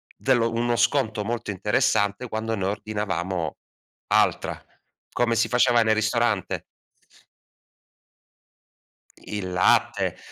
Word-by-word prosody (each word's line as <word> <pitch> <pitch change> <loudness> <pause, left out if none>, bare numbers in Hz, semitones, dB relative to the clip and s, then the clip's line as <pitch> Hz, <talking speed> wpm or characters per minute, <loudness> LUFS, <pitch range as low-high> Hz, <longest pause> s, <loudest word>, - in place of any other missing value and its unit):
dello 120 -3 +1
uno 120 +1 0
sconto 120 -3 +1
molto 115 +1 -4
interessante 105 +2 0
quando 110 +1 -2
ne 95 -3 -2
ordinavamo 95 -5 -3 0.5
altra, - - +1 0.5
come 120 -1 +1
si 115 - +2
faceva 120 -1 +4
nel 110 -1 +3
ristorante. 110 -1 0 2.5
I 105 - -7
il 95 -3 -4
latte 90 0 +2
110 Hz, 100 wpm, -24 LUFS, 100-120 Hz, 2.5 s, faceva